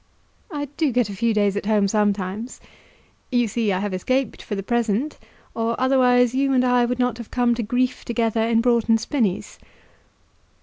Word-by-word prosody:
"I 290 -2 -3
do 310 -4 +1
get 245 -3 +1
a - - -7
few 230 +4 +1
days 205 -2 +1
at 205 - -3
home 210 -2 +3
sometimes. 205 +2 -1 0.7
You 245 -2 +2
see 220 0 -1
I 185 - 0
have 200 0 -3
escaped 255 +6 -1
for 205 - -5
the 195 - -4
present, 235 +5 -1 0.3
or 230 0 -2
otherwise 250 -2 +3
you 270 +1 +1
and 255 -1 +3
I 245 -1 +3
would 245 +1 -2
not 250 -2 0
have 235 - -8
come 245 -1 +1
to 235 - -2
grief 250 +3 -1
together 230 -1 0
in 230 0 +2
Broughton 230 -2 +3
Spinnies." 225 -5 -2
235 Hz, 180 wpm, -22 LUFS, 210-250 Hz, 0.7 s, home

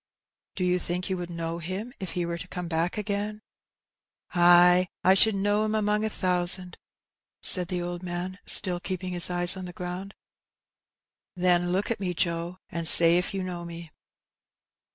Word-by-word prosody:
*' - - -65
" - - -65
Do 185 - -3
you 180 0 +1
think 180 +2 -5
you 185 - -1
would 175 -1 -6
know 165 0 -5
him 190 +8 -6
if 190 -4 -6
he 175 -1 -2
were 170 0 -5
to 180 - -9
come 180 -1 -6
back 165 +3 -2
again? 210 +1 -4 0.5
*' - - -33
^^Ay, 175 +1 +5 0.2
I 190 - +5
should 210 +2 +3
know 205 +2 0
*im 215 0 -2
among 210 0 0
a 220 - -1
thousand," 180 -1 +2 0.7
said 180 -2 +2
the 180 -1 -4
old 175 0 -6
man, 180 +1 -6
still 180 -2 +3
keeping 185 0 -5
his 175 -1 +3
eyes 175 0 +3
on 185 -1 -7
the 175 - -9
ground. 180 +2 -7 1.2
"Then 175 -1 +1
look 195 +5 -1
at 230 - -3
me, 180 -3 -4
Joe, 170 +2 -3
and 170 -1 +4
say 170 +2 +7
if 180 - -3
you 195 -1 -4
know 175 -1 -6
me. 170 -1 -10
180 Hz, 190 wpm, -26 LUFS, 175-190 Hz, 1.2 s, say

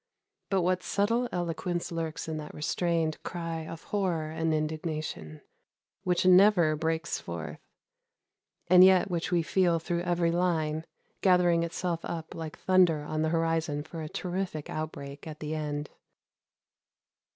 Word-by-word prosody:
But 190 -3 +2
what 180 +1 +1
subtle 230 +6 +1
eloquence 175 0 -2
lurks 165 -2 -3
in 160 -1 -3
that 150 -1 -7
restrained 165 0 0
cry 165 -2 -4
of 165 0 -8
horror 175 -6 -1
and 160 0 -1
indignation 155 - -3 0.6
which 180 -2 +1
never 185 -4 +6
breaks 160 +1 -1
forth, 80 -3 -6 1.1
and 180 +1 +8
yet 185 0 +5
which 175 +1 -2
we 170 -2 +2
feel 175 0 +2
through 170 +1 -2
every 175 -1 +1
line, 160 -3 0 0.4
gathering 180 -3 +4
itself 170 0 -2
up 165 -2 -5
like 160 -2 -6
thunder 180 -5 +3
on 155 +1 -2
the 160 - +1
horizon 165 -2 0
for 160 +1 -8
a 155 - -5
terrific 180 -4 -4
outbreak 145 -2 -6
at 155 -1 -8
the 155 0 -4
end! 150 -1 -3
165 Hz, 140 wpm, -29 LUFS, 155-180 Hz, 1.1 s, and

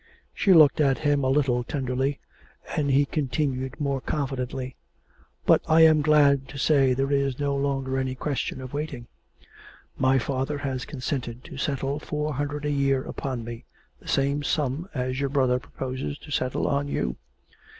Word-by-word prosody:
She 195 - +2
looked 155 -4 +7
at 135 -3 +3
him 145 -2 +1
a 130 - +2
little 130 -3 +2
tenderly, 130 +1 -2 0.6
and 145 -2 +1
he 140 +1 +4
continued 130 -2 -2
more 140 -2 -1
confidently. 130 -3 -3 0.7
'But - - +5
I'm 160 -1 +6
glad 140 -3 +4
to 140 - -9
say 135 -2 +3
there 135 +2 0
is 140 -2 +1
no 140 -1 0
longer 135 -1 -1
any 130 -1 -2
question 135 -1 -3
of 130 0 -8
waiting. 145 -5 -4 0.9
My 130 0 +4
father 135 +3 -1
has 135 -2 -3
consented 130 -3 -4
to - - -10
settle 140 +1 -1
four 150 -1 -3
hundred 145 +2 -3
a 150 - 0
year 135 -2 +1
upon 130 -4 -4
me, 115 0 -8 0.3
the - - -18
same 140 +1 +1
sum 150 +4 -1
as 130 0 -2
your 140 -1 0
brother 130 -3 +2
proposes 130 +2 -5
to 145 - -13
settle 130 -2 0
on 140 0 0
you. 60 - -2
135 Hz, 160 wpm, -26 LUFS, 130-145 Hz, 0.9 s, looked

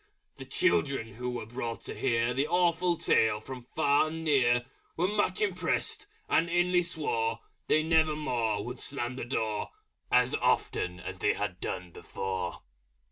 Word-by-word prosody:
The - - -8
children 135 - +1
who 125 +3 -4
were 120 -3 -4
brought 115 0 -5
to - - -5
hear 120 -1 +1
The 135 +4 +1
awful 175 0 +2
Tale 110 -6 +3
from 125 +2 -9
far 145 -1 +4
and 160 +1 -5
near 125 -5 +3 0.3
Were 175 +3 +2
much 210 - 0
impressed, 430 0 0 0.2
and 170 - +2
inly 175 +1 +3
swore 445 - -1 0.3
They 155 - +3
never 160 -1 +3
more 115 -8 -1
would 125 +1 -6
slam 125 -3 -2
the 130 - -4
Door. 110 -4 -2 0.4
As - - +4
often 90 -1 0 0.2
they - - +3
had 100 -3 -3
done 90 -1 -4
before. 95 -1 -4
130 Hz, 150 wpm, -30 LUFS, 115-165 Hz, 0.4 s, far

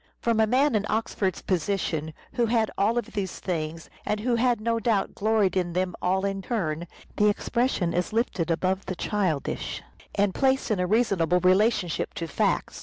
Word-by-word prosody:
From 230 -1 +1
a 220 - +4
man 265 +4 +3
in 210 -1 +1
Oxford's 210 -3 -1
position, 165 -4 -1 0.2
who 240 -1 +1
had 230 +1 +3
had 220 - 0
all 220 +4 +2
of 240 - -2
these 190 -3 -3
things, 165 -3 -4 0.2
and 210 0 -1
who 245 +2 +1
had 240 -1 +2
no 230 +1 0
doubt 220 -3 0
gloried 210 -3 +1
in 175 -2 0
them 180 0 0
all 190 +2 +1
in 195 0 -2
turn, 175 -7 -2 0.3
the 210 0 +5
expression 220 -4 0
is 180 0 -1
lifted 215 -7 0
above 185 +3 0
the 185 - -3
childish 180 -7 -2 0.3
and 200 -1 +2
placed 265 -3 +1
in 205 - +1
a 180 - +1
reasonable 190 -5 +2
relationship 185 -1 +2
to 165 - -3
facts. 160 - -1
200 Hz, 180 wpm, -26 LUFS, 180-225 Hz, 0.3 s, the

